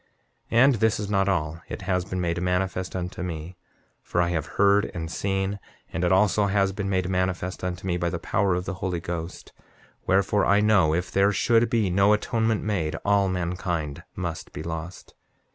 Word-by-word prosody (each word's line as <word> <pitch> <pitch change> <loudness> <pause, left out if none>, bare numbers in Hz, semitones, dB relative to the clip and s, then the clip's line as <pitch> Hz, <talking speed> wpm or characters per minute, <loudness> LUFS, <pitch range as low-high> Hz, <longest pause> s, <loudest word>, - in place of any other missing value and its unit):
7:12 115 - +1
And 135 +2 +6
this 110 +1 +2
is 105 -1 -4
not 95 -1 +2
all—it 85 +1 -3
has 90 -1 0
been 95 0 -4
made 85 0 -1
manifest 90 0 -1
unto 90 -1 -4
me, 85 0 -5 0.5
for 85 - -2
I 85 0 +2
have 80 -2 -2
heard 100 +1 +4
and 80 -1 -4
seen; 95 +1 -1 0.3
and 85 - -2
it 90 - +2
also 100 +2 +3
has 100 -1 +2
been 100 0 -3
made 95 -2 0
manifest 90 0 -2
unto 90 0 -4
me 90 -2 0
by 85 0 0
the - - -3
power 95 -2 +1
of 90 0 -3
the 95 - -3
Holy 90 -3 -1
Ghost; 85 +1 -6 0.5
wherefore, 100 +1 +3
I 100 - +4
know 100 -7 +4
if 90 +1 -2
there 100 +1 +3
should 115 +3 +3
be 110 -6 +1
no 100 +3 +4
atonement 110 0 0
made 90 -8 -1
all 100 -1 +3
mankind 85 -4 -2
must 85 -3 -5
be - - -6
lost. 85 +2 -7
95 Hz, 190 wpm, -25 LUFS, 85-100 Hz, 0.5 s, And